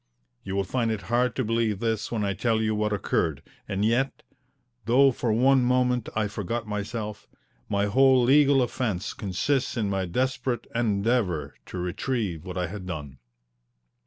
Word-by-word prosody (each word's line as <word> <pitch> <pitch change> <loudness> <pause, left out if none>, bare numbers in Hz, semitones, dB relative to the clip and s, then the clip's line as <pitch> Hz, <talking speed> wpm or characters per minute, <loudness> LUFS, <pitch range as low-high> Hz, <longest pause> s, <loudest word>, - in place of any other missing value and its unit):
You 95 -1 -4
will 100 - +1
find 115 +4 -1
it 110 -3 -2
hard 125 -1 +2
to 130 - 0
believe 115 -2 +1
this 110 0 -2
when 110 -3 -1
I 100 - 0
tell 110 +3 +1
you 110 0 +1
what 105 0 0
occurred, 80 -7 -1 0.2
and 100 +1 -1
yet 120 +5 0 0.6
though 135 +4 +5
for 120 -2 -1
one 130 +3 +4
moment 125 -1 +1
I 110 -1 +1
forgot 105 +3 -3
myself 105 +1 -4 0.4
my 100 0 +1
whole 130 +4 +5
legal 140 +1 +5
offence 110 -6 -2
consists 125 +8 -1
in 105 -3 0
my 95 -1 -1
desperate 125 +3 -1
endeavour 105 - 0
to - - -7
retrieve 90 - -2
what 95 -1 -6
I 90 - 0
had 95 +1 -7
done. 75 -7 -6
110 Hz, 160 wpm, -26 LUFS, 100-125 Hz, 0.6 s, though